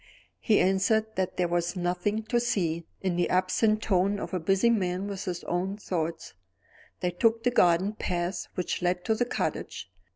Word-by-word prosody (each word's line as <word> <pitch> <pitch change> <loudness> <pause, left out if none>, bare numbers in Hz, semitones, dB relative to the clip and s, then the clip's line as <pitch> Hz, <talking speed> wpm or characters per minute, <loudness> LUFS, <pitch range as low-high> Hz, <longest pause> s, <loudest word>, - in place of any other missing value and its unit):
He 215 -3 +3
answered 215 +4 +2
that 185 -1 -2
there 180 - +2
was 175 +1 -1
nothing 180 +4 -1
to 240 +2 +1
see, 170 -9 -1
in 185 -2 -1
the 175 - +1
absent 215 +4 +2
tone 195 +1 +2
of - - -6
a 185 - 0
man 160 - -14
busy 195 +5 +3
with 195 -1 -1
his 175 -2 -4
own 185 +3 -2
thoughts. 165 -5 -3 0.7
They 180 - 0
took 225 +5 +2
the 245 - +2
garden 185 -2 +3
path 175 -3 -2
which 180 - -2
led 180 0 0
to 220 - +2
the 240 +2 0
cottage. - - -3
185 Hz, 175 wpm, -28 LUFS, 175-215 Hz, 0.7 s, He